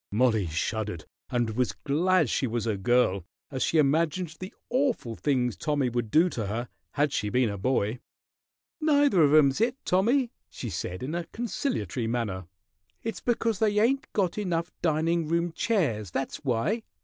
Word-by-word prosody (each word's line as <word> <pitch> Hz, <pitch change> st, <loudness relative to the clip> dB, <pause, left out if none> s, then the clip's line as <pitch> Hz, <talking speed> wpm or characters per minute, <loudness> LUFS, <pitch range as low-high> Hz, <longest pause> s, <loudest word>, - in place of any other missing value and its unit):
Mollie 110 Hz, -3 st, +2 dB
shuddered 90 Hz, +1 st, -3 dB, 0.2 s
and 120 Hz, -2 st, 0 dB
was 125 Hz, +2 st, 0 dB
glad 165 Hz, +3 st, +2 dB
she 130 Hz, -, 0 dB
was 115 Hz, -1 st, -2 dB
a 110 Hz, -2 st, 0 dB
girl 100 Hz, -2 st, +2 dB, 0.3 s
as 130 Hz, -2 st, -4 dB
she 165 Hz, -, +2 dB
imagined 160 Hz, +3 st, +1 dB
the 185 Hz, +1 st, -6 dB, 0.2 s
awful 250 Hz, -, 0 dB
things 125 Hz, -6 st, 0 dB
Tommy 145 Hz, -4 st, 0 dB
would 120 Hz, -2 st, -2 dB
do 160 Hz, +9 st, +5 dB
to 115 Hz, -, -3 dB
her 115 Hz, +4 st, -3 dB, 0.2 s
had 145 Hz, -1 st, +1 dB
she 105 Hz, -, -1 dB
been 125 Hz, 0 st, +2 dB
a 100 Hz, -, -5 dB
boy. 120 Hz, 0 st, 0 dB, 0.8 s
"Neither 290 Hz, -, +4 dB
of 145 Hz, -2 st, +5 dB
'em's 150 Hz, +2 st, +5 dB
it, 245 Hz, +3 st, +1 dB
Tommy," 235 Hz, +7 st, +2 dB, 0.2 s
she 120 Hz, -, -6 dB
said, 90 Hz, +4 st, -4 dB
in 140 Hz, +5 st, -3 dB
a 175 Hz, 0 st, -2 dB
conciliatory 165 Hz, -, -3 dB
manner. 105 Hz, -7 st, -2 dB, 0.6 s
"It's 225 Hz, -, -4 dB
because 230 Hz, -4 st, 0 dB
they 210 Hz, -2 st, +2 dB
ain't 270 Hz, +8 st, +1 dB
got 195 Hz, -1 st, 0 dB
enough 170 Hz, -4 st, -1 dB
dining 165 Hz, 0 st, +1 dB
room 170 Hz, +1 st, 0 dB
chairs, 150 Hz, -, 0 dB
that's 135 Hz, +10 st, -3 dB
why. 140 Hz, -, 0 dB
145 Hz, 165 wpm, -27 LUFS, 115-185 Hz, 0.8 s, do